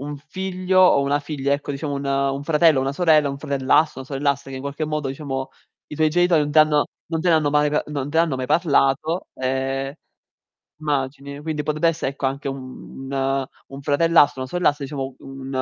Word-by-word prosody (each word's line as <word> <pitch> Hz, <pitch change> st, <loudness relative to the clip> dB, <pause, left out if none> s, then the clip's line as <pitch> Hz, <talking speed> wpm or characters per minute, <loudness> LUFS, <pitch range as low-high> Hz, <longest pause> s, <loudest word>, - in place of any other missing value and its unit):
un 145 Hz, +1 st, -5 dB
figlio 185 Hz, +4 st, -1 dB
o 180 Hz, -6 st, +6 dB
una 140 Hz, +1 st, +1 dB
figlia 145 Hz, -2 st, -2 dB
ecco, 140 Hz, 0 st, -2 dB
diciamo 145 Hz, +1 st, -4 dB
un 140 Hz, 0 st, -4 dB
un 140 Hz, 0 st, 0 dB
fratello 155 Hz, -2 st, +4 dB
o -, -, +1 dB
una 135 Hz, +1 st, -1 dB
sorella, 155 Hz, -3 st, +3 dB
un 140 Hz, -, -4 dB
fratellastro, 140 Hz, +1 st, +1 dB
una -, -, -7 dB
sorellastra 140 Hz, 0 st, -1 dB
che 130 Hz, -, -6 dB
in 130 Hz, -, -7 dB
qualche 140 Hz, +2 st, -3 dB
modo, 150 Hz, -2 st, -2 dB
diciamo, 135 Hz, -1 st, -4 dB, 0.4 s
i 150 Hz, -, -8 dB
tuoi 155 Hz, -1 st, +3 dB
genitori 175 Hz, 0 st, +3 dB
non 145 Hz, -, -3 dB
t'hanno 155 Hz, -1 st, +5 dB, 0.2 s
non 165 Hz, -1 st, -2 dB
te 175 Hz, -, 0 dB
ne -, -, +5 dB
hanno 155 Hz, -2 st, +2 dB
mai 150 Hz, 0 st, +3 dB
pa 150 Hz, -, +1 dB
non 145 Hz, -2 st, -4 dB
te 150 Hz, -, -4 dB
ne -, -, +6 dB
hanno 160 Hz, -6 st, -1 dB
mai 130 Hz, 0 st, -3 dB
parlato, 155 Hz, +1 st, +1 dB
ehm 135 Hz, +1 st, -2 dB, 0.9 s
immagini. 140 Hz, -1 st, -3 dB
Quindi 150 Hz, -1 st, -3 dB
potrebbe 155 Hz, +3 st, +1 dB
esse 165 Hz, -3 st, -1 dB
ecco, 140 Hz, 0 st, -3 dB
anche 140 Hz, +1 st, -3 dB
un 135 Hz, 0 st, -8 dB, 0.6 s
un 135 Hz, 0 st, -9 dB
fratellastro, 145 Hz, -1 st, +3 dB
una 130 Hz, -, -7 dB
sorellastra, 150 Hz, -5 st, +1 dB
diciamo, 135 Hz, -2 st, -5 dB
un 135 Hz, 0 st, -9 dB
145 Hz, 205 wpm, -22 LUFS, 135-155 Hz, 0.9 s, o